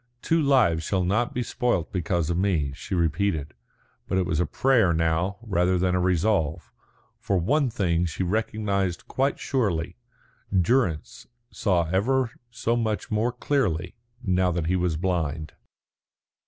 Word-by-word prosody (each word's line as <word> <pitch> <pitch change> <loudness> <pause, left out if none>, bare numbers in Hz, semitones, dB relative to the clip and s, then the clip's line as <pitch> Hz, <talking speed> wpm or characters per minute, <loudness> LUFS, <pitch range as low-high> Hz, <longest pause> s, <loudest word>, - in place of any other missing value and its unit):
"Two 165 0 +2
lives 125 - +3
shall 95 +2 0
not 110 +7 +1
be 125 - -2
spoilt 120 -9 -1
because 85 -2 0
of 85 - 0
me," 85 -8 +1
she 80 +6 -5
repeated, 80 -2 0 0.5
but - - 0
it 95 - +2
was 80 -3 -1
a 90 - +1
prayer 115 - +3
now, 80 +4 0
rather 90 -4 +1
than 90 0 +1
a 90 - +2
resolve. 90 -3 0 0.5
For 100 - 0
one 130 - +2
thing 90 -6 0
she 85 +3 -3
recognised 100 -2 -1
quite 135 +2 0
surely: 95 - -1 0.5
Durrance 95 - 0 0.2
saw 90 -6 +1
ever 120 +6 +1 0.2
so 120 0 -1
much 110 -3 -2
more 110 +3 +1
clearly 105 - -1 0.3
now 95 -2 +2
that 85 -1 -2
he 90 +3 +1
was 90 -3 0
blind. 80 -4 -2
95 Hz, 145 wpm, -25 LUFS, 85-110 Hz, 0.5 s, lives